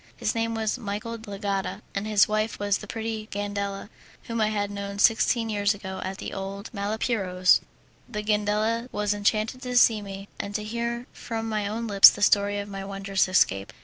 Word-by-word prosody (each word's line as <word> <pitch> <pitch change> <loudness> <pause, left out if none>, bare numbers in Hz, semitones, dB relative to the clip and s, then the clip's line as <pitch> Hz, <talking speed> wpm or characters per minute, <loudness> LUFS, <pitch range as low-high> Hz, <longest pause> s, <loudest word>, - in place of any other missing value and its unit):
His - - -1
name 230 -1 -1
was 220 +2 -1
Michel 220 +1 -4
de 220 - -11
l'Agata, 200 -1 -3
and 200 +2 -3
his 210 -1 +5
wife 215 +1 -1
was 205 -1 0
the 210 - -9
pretty 220 -1 -4
Gandela, 200 -1 -3 0.4
whom 230 -1 -3
I 215 - +3
had 205 -1 -1
known 200 0 -5
sixteen 225 +2 +3
years 205 -1 +1
ago 190 -2 -7
at 190 +1 -4
the - - -6
old 195 +1 -6
Malipiero's. 200 -3 +2 0.5
The 210 -3 -4
Gandela 215 +3 0
was 210 0 0
enchanted 215 +4 0
to 250 -2 -1
see 225 -3 +5
me, 195 0 -8
and 200 0 -5
to 215 - -1
hear 235 +2 -3
from 225 -1 -5
my 215 -2 -1
own 225 +3 -3
lips 200 -3 +9
the 205 - -3
story 205 0 +3
of 200 0 -4
my 195 -1 -6
wondrous 195 0 0
escape. 100 - +2
205 Hz, 190 wpm, -26 LUFS, 200-225 Hz, 0.5 s, lips